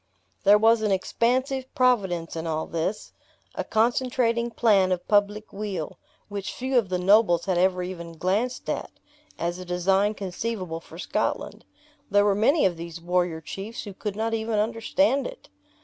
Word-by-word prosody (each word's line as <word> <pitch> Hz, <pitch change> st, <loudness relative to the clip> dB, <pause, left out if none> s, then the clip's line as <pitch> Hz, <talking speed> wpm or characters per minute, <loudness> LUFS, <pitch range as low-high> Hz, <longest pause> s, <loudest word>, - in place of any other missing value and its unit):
There 205 Hz, +1 st, +8 dB
was 225 Hz, +1 st, +4 dB
an 215 Hz, -, +1 dB
expansive 255 Hz, +7 st, 0 dB
providence 195 Hz, -11 st, +1 dB
in 165 Hz, 0 st, -4 dB
all 160 Hz, 0 st, -1 dB
this, 170 Hz, +5 st, -3 dB, 0.4 s
a -, -, -3 dB
concentrating 235 Hz, +1 st, +1 dB
plan 205 Hz, -5 st, +3 dB
of 180 Hz, -1 st, -2 dB
public 205 Hz, +1 st, +1 dB
weal, 195 Hz, -6 st, -5 dB, 0.3 s
which 200 Hz, -2 st, -5 dB
few 260 Hz, +1 st, -2 dB
of 205 Hz, -6 st, -4 dB
the 185 Hz, -, 0 dB
nobles 180 Hz, -2 st, +4 dB
had 185 Hz, -2 st, +1 dB
ever 185 Hz, 0 st, +2 dB
even 170 Hz, -2 st, -7 dB
glanced 210 Hz, +9 st, -1 dB
at, -, -, -2 dB, 0.5 s
as 175 Hz, +2 st, -2 dB
a -, -, -6 dB
design 190 Hz, +4 st, +1 dB
conceivable 185 Hz, -3 st, -4 dB
for 165 Hz, 0 st, -14 dB
Scotland. -, -, -2 dB, 0.4 s
There 205 Hz, 0 st, +4 dB
were 205 Hz, -, +4 dB
many 255 Hz, +10 st, +3 dB
of 175 Hz, -3 st, +1 dB
these 170 Hz, 0 st, -7 dB
warrior 175 Hz, -1 st, 0 dB
chiefs 200 Hz, +8 st, -6 dB
who 205 Hz, -, -8 dB
could 205 Hz, +1 st, -5 dB
not 225 Hz, +1 st, -1 dB
even 220 Hz, -1 st, -1 dB
understand 235 Hz, +6 st, +1 dB
it. -, -, -12 dB
205 Hz, 165 wpm, -25 LUFS, 180-230 Hz, 0.5 s, There